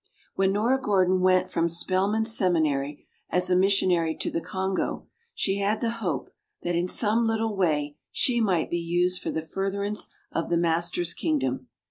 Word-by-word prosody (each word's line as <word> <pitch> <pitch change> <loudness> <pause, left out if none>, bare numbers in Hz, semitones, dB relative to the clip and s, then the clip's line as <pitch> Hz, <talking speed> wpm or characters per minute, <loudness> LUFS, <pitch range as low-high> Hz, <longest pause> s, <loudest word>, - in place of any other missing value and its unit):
When 190 0 +2
Nora 240 +6 +1
Gordon 185 -4 +2
went 185 0 +3
from 170 0 +1
Spelman 190 +6 +1
Seminary 155 -10 0 0.2
as 180 0 +1
a - - +5
missionary 180 -4 +3
to - - -2
the 165 - -2
Congo, 190 0 -2 0.3
she 195 0 0
had 205 +2 0
the 230 -1 0
hope 165 - -3 0.3
that 175 - -1
in 175 +1 0
some 220 +4 +3
little 225 -1 0
way 150 -5 0
she 250 -7 +2
might 185 -7 +1
be 175 - 0
used 175 +2 0
for - - -3
the 160 - -2
furtherance 200 +4 -2 0.2
of 165 - -2
the 170 - +2
Master's 170 0 0
kingdom. 130 -4 -1
185 Hz, 165 wpm, -26 LUFS, 165-200 Hz, 0.3 s, a